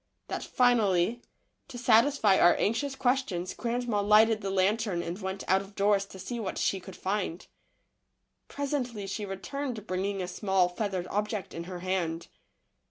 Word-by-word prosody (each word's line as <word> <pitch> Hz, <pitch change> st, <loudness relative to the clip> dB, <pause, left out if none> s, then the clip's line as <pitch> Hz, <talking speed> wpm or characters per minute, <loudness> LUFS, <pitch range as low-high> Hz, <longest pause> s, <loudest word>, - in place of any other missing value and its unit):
that -, -, -3 dB
finally, 230 Hz, -4 st, +2 dB, 0.5 s
to 245 Hz, -, -9 dB
satisfy 235 Hz, -2 st, +4 dB
8 -, -, +4 dB
THE -, -, +2 dB
LITTLE -, -, +9 dB
FORESTERS. -, -, -5 dB
our -, -, +2 dB
anxious 265 Hz, +6 st, -1 dB
questions, 245 Hz, -9 st, 0 dB
grandma 235 Hz, -3 st, -1 dB
lighted 215 Hz, +2 st, +5 dB
the 195 Hz, -, -3 dB
lantern 195 Hz, -1 st, +1 dB
and 175 Hz, +5 st, -5 dB
went 190 Hz, +1 st, -4 dB
out 190 Hz, +1 st, +3 dB
of 195 Hz, +1 st, -13 dB
doors 200 Hz, -1 st, +2 dB
to 195 Hz, -, -12 dB
see 235 Hz, +6 st, -5 dB
what 200 Hz, -4 st, -4 dB
she 195 Hz, -, +1 dB
could 185 Hz, 0 st, -11 dB
find. 190 Hz, -3 st, -3 dB, 1.0 s
Presently 260 Hz, -7 st, -3 dB
she 200 Hz, +2 st, -4 dB
returned 215 Hz, +4 st, -5 dB
bringing 195 Hz, +1 st, -2 dB
a -, -, -4 dB
small, 190 Hz, -1 st, +1 dB
feathered 185 Hz, -1 st, -3 dB
object 210 Hz, 0 st, -2 dB
in 170 Hz, +1 st, -6 dB
her 180 Hz, -1 st, -7 dB
hand. 175 Hz, -3 st, -2 dB
200 Hz, 170 wpm, -29 LUFS, 185-230 Hz, 1.0 s, LITTLE